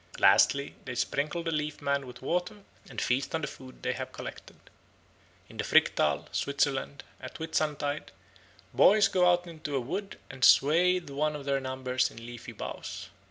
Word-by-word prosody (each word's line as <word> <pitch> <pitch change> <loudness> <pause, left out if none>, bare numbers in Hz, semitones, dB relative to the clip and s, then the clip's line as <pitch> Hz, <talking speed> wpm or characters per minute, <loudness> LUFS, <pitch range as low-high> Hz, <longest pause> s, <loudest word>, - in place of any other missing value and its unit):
Lastly, 140 0 +4
they 125 - -5
sprinkle 150 +7 -1
the 165 - -2
Leaf 150 -1 -2
Man 140 -1 -1
with 125 +1 -11
water 180 +7 -2 0.3
and - - -5
feast 130 +5 0
on 160 - -1
the 150 - -2
food 130 -1 -12
they - - 0
have - - -6
collected. - - -9 0.9
In - - -14
the - - -1
Fricktal, 75 -1 +3
Switzerland, 140 -1 -1 0.2
at - - -9
Whitsuntide 150 -2 -2 0.6
boys 205 0 +6
go 180 -2 +3
out 175 0 +1
into 155 -4 -6
a - - +2
wood 190 +11 -5
and 130 -2 -8
swathe 170 +2 +5
one 150 +2 0
of 145 -2 -7
their 140 -1 +1
number 130 -1 -5
in - - -16
leafy 120 +1 -9
boughs. 115 - -7
145 Hz, 165 wpm, -29 LUFS, 130-165 Hz, 0.9 s, boys